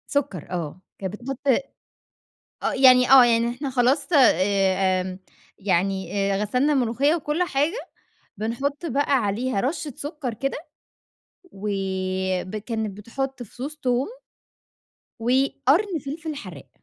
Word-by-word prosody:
سكّر 280 Hz, -, -1 dB
آه، 175 Hz, -1 st, -4 dB, 0.2 s
كانت 190 Hz, -1 st, -4 dB
بتحط 270 Hz, +2 st, -6 dB, 1.2 s
آه -, -, +1 dB
يعني 255 Hz, -1 st, +6 dB
آه 265 Hz, -2 st, +10 dB
يعني 235 Hz, 0 st, +2 dB
إحنا 260 Hz, +4 st, -4 dB
خلاص 265 Hz, +3 st, +2 dB
آآ 190 Hz, -, +3 dB, 0.4 s
يعني 190 Hz, -1 st, 0 dB, 0.2 s
آآ 195 Hz, -, 0 dB
غسلنا 250 Hz, +8 st, +1 dB
الملوخية 270 Hz, +4 st, +2 dB
وكل 310 Hz, +1 st, -1 dB
حاجة، 330 Hz, -, -1 dB, 0.5 s
بنحط 275 Hz, +9 st, -2 dB
بقى 285 Hz, -1 st, +1 dB
عليها 215 Hz, +2 st, -1 dB
رشة 290 Hz, +1 st, -2 dB
سكّر 290 Hz, -4 st, -4 dB
كده 275 Hz, +5 st, -3 dB, 1.0 s
وب 190 Hz, -1 st, -2 dB
كانت 220 Hz, -2 st, -4 dB
بتحط 265 Hz, +4 st, -4 dB
فصوص 260 Hz, +7 st, -7 dB
توم 255 Hz, -2 st, 0 dB, 1.1 s
وقرن 275 Hz, -, +2 dB
فلفل 310 Hz, +2 st, -5 dB
حراق. 180 Hz, -, -10 dB
245 Hz, 110 wpm, -24 LUFS, 195-280 Hz, 1.2 s, آه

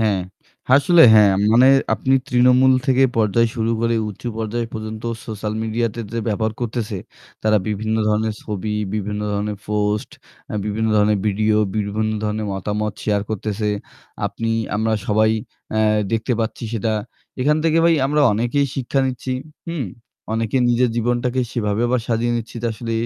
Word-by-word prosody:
হ্যাঁ, 105 Hz, -4 st, +2 dB, 0.5 s
আসলে 145 Hz, +6 st, +6 dB
হ্যাঁ 105 Hz, -2 st, +6 dB, 0.2 s
মানে 120 Hz, +3 st, +6 dB, 0.3 s
আপনি 130 Hz, -, +1 dB
তৃণমূল 125 Hz, +1 st, +5 dB
থেকে 135 Hz, -1 st, +4 dB
পর্যায় 115 Hz, +1 st, +3 dB
শুরু 115 Hz, -1 st, -1 dB
করে 115 Hz, 0 st, +1 dB
উঁচু 105 Hz, +4 st, -6 dB
পর্যায় 115 Hz, +2 st, -2 dB
পর্যন্ত 110 Hz, 0 st, -6 dB, 0.2 s
সোশ্যাল 105 Hz, -1 st, -4 dB
মিডিয়াতে 115 Hz, +1 st, -2 dB
যে 115 Hz, -, -2 dB
ব্যবহার 110 Hz, +1 st, 0 dB
করতেছে 110 Hz, -4 st, -3 dB, 0.4 s
তারা 110 Hz, 0 st, +3 dB
বিভিন্ন 110 Hz, +1 st, -1 dB
ধরণের 110 Hz, +1 st, 0 dB
ছবি, 105 Hz, 0 st, -3 dB, 0.2 s
বিভিন্ন 105 Hz, 0 st, -3 dB
ধরণের 105 Hz, 0 st, -2 dB
পোস্ট, 105 Hz, 0 st, -1 dB, 0.4 s
আ -, -, -3 dB
বিভিন্ন 110 Hz, +2 st, -1 dB
ধরণের 105 Hz, 0 st, +3 dB
ভিডিও 105 Hz, +1 st, +2 dB, 0.2 s
বিভিন্ন 110 Hz, +1 st, -1 dB
ধরণের 105 Hz, 0 st, -2 dB
মতামত 105 Hz, +2 st, -2 dB
শেয়ার 105 Hz, -2 st, +1 dB
করতেছে। 105 Hz, 0 st, -2 dB, 0.6 s
আপনি 115 Hz, 0 st, -3 dB, 0.3 s
আমরা 110 Hz, +1 st, 0 dB
সবাই 110 Hz, +1 st, +3 dB, 0.5 s
আ -, -, +2 dB, 0.3 s
দেখতে 115 Hz, +2 st, 0 dB
পাচ্ছি 115 Hz, +1 st, -3 dB
সেটা। 110 Hz, -1 st, -1 dB, 0.5 s
এখান 150 Hz, +4 st, +3 dB
থেকে 165 Hz, 0 st, +3 dB
ভাই 170 Hz, 0 st, +5 dB
আমরা 150 Hz, +2 st, +1 dB
অনেকেই 120 Hz, +6 st, +1 dB
শিক্ষা 135 Hz, +1 st, 0 dB
নিচ্ছি। 130 Hz, 0 st, -3 dB, 0.4 s
হুম? 165 Hz, -6 st, -2 dB, 0.5 s
অনেকে 115 Hz, +2 st, -1 dB
নিজের 120 Hz, 0 st, +2 dB
জীবনটাকে 120 Hz, +2 st, 0 dB
সেভাবে 105 Hz, -2 st, -1 dB
আবার 125 Hz, 0 st, +1 dB
সাজিয়ে 120 Hz, +1 st, +1 dB
নিচ্ছি 115 Hz, 0 st, -6 dB
যে -, -, 0 dB
আসলে 115 Hz, +1 st, -5 dB
110 Hz, 150 wpm, -20 LUFS, 105-120 Hz, 0.6 s, আসলে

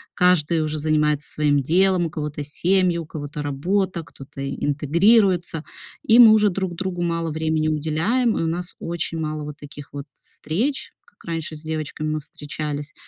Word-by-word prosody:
каждый 170 Hz, -3 st, +3 dB
уже 155 Hz, 0 st, -3 dB
занимается 150 Hz, -1 st, +1 dB
своим 145 Hz, -2 st, +2 dB
делом, 180 Hz, +3 st, +3 dB
у -, -, -7 dB
кого-то 150 Hz, -1 st, -4 dB
семьи, 180 Hz, +4 st, +1 dB
у 165 Hz, -, -4 dB
кого-то 150 Hz, -1 st, -6 dB
работа, 175 Hz, +5 st, -1 dB
кто-то 135 Hz, -1 st, -11 dB
интегрируется, 170 Hz, +3 st, +2 dB, 0.4 s
и 225 Hz, -, +5 dB
мы 230 Hz, -3 st, +10 dB
уже 210 Hz, -1 st, +4 dB
друг 185 Hz, -1 st, -3 dB
другу 185 Hz, 0 st, -3 dB
мало 165 Hz, -1 st, -1 dB
времени 155 Hz, 0 st, 0 dB
уделяем, 160 Hz, -, +1 dB
и -, -, 0 dB
у 165 Hz, -, 0 dB
нас 175 Hz, +2 st, -3 dB
очень 170 Hz, -1 st, -3 dB
мало 155 Hz, -1 st, -3 dB
вот 150 Hz, 0 st, -7 dB
таких 145 Hz, -1 st, -11 dB
вот 140 Hz, -1 st, -6 dB
встреч, 235 Hz, -, -3 dB
как 205 Hz, -, -24 dB
раньше 165 Hz, -2 st, -4 dB
с 150 Hz, -, -10 dB
девочками 155 Hz, -1 st, -4 dB
мы 155 Hz, -, -1 dB
встречались, 145 Hz, 0 st, -6 dB
160 Hz, 165 wpm, -22 LUFS, 150-180 Hz, 0.4 s, мы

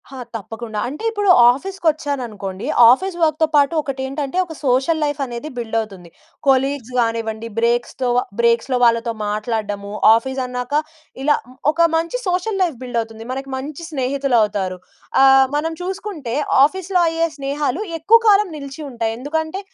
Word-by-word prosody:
ఆ! -, -, -8 dB, 0.2 s
తప్పకుండా. 225 Hz, +1 st, -6 dB
అంటే, 295 Hz, -, -7 dB
ఇప్పుడు 410 Hz, -3 st, 0 dB, 0.2 s
ఆఫీస్‌కొచ్చాననుకోండి, 275 Hz, -, -3 dB, 0.3 s
ఆఫీస్ 375 Hz, +8 st, 0 dB
వర్క్‌తో 315 Hz, 0 st, +2 dB
పాటు 285 Hz, +2 st, +4 dB
ఒకటేంటంటే, 275 Hz, +3 st, -4 dB
ఒక 330 Hz, -, -9 dB
సోషల్ 265 Hz, +6 st, +2 dB
లైఫనేది 280 Hz, -2 st, -4 dB
బిల్డవుతుంది. 220 Hz, -6 st, -4 dB, 0.4 s
కొలీగ్స్ 270 Hz, -2 st, +1 dB
గానివ్వండి, 230 Hz, -1 st, -1 dB
బ్రేక్స్‌తోవ 240 Hz, +1 st, 0 dB, 0.2 s
బ్రేక్స్‌‌లో 235 Hz, +2 st, +2 dB
వాళ్ళతో 230 Hz, 0 st, +2 dB, 0.2 s
మాట్లాడడము. 210 Hz, -1 st, -3 dB, 0.2 s
ఆఫీసన్నాక 250 Hz, +1 st, -3 dB, 0.5 s
ఇలా 295 Hz, +1 st, +4 dB, 0.2 s
మ్ -, -, -17 dB, 0.2 s
ఒక 335 Hz, +1 st, +3 dB
మంచి 335 Hz, +8 st, -2 dB
సోషల్ 370 Hz, +3 st, -1 dB
లైఫ్ 330 Hz, -8 st, -2 dB
బిల్డవుతుంది. 225 Hz, -3 st, -4 dB
మనకి 270 Hz, +1 st, -6 dB
మంచి 285 Hz, +4 st, -7 dB
స్నేహితులవుతారు. 245 Hz, -9 st, 0 dB, 0.5 s
ఆహ్, 270 Hz, 0 st, +7 dB
మనం 320 Hz, +2 st, -1 dB
చూసుకుంటే, 370 Hz, -, -5 dB, 0.3 s
ఆఫీస్‌లో 370 Hz, +3 st, -1 dB
అయ్యే 330 Hz, 0 st, 0 dB
స్నేహాలు 280 Hz, +4 st, -2 dB, 0.2 s
ఎక్కువ 435 Hz, +9 st, +5 dB
కాలం 415 Hz, 0 st, +5 dB
నిలిచి 280 Hz, +1 st, -8 dB
ఉంటాయి. 230 Hz, -3 st, -2 dB
ఎందుకంటే, 315 Hz, +6 st, -3 dB
270 Hz, 125 wpm, -19 LUFS, 230-315 Hz, 0.5 s, ఆహ్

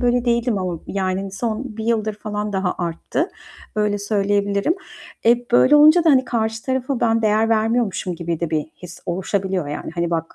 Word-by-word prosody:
böyle 245 Hz, -1 st, +2 dB
değildim 235 Hz, -2 st, +1 dB
ama, 180 Hz, -3 st, -3 dB
yani, 190 Hz, 0 st, -2 dB
son 225 Hz, +4 st, -2 dB
1 220 Hz, -, -4 dB
yıldır 220 Hz, -2 st, 0 dB
falan 210 Hz, 0 st, -4 dB
daha 190 Hz, -2 st, 0 dB
arttı. 175 Hz, -, -2 dB, 0.5 s
Öyle 210 Hz, -1 st, +1 dB
söyleyebilirim. 205 Hz, +5 st, +1 dB, 0.5 s
E, 240 Hz, +1 st, +3 dB
böyle 255 Hz, +4 st, +6 dB
olunca 310 Hz, +3 st, +7 dB
da, 320 Hz, -, +6 dB
hani, 260 Hz, -2 st, +4 dB
karşı 225 Hz, -2 st, -2 dB
tarafa 260 Hz, 0 st, -2 dB
ben 225 Hz, 0 st, +2 dB
değer 220 Hz, +1 st, +3 dB
vermiyormuşum 220 Hz, -4 st, 0 dB
gibi 170 Hz, -1 st, -4 dB
de 170 Hz, -, -2 dB
bir 155 Hz, -2 st, -1 dB, 0.2 s
his 175 Hz, 0 st, -10 dB
oluşabiliyor. 190 Hz, -2 st, -1 dB
Yani, 145 Hz, -, -5 dB
hani, 170 Hz, -1 st, -1 dB
bak, 165 Hz, -1 st, -2 dB
210 Hz, 175 wpm, -21 LUFS, 185-235 Hz, 0.5 s, olunca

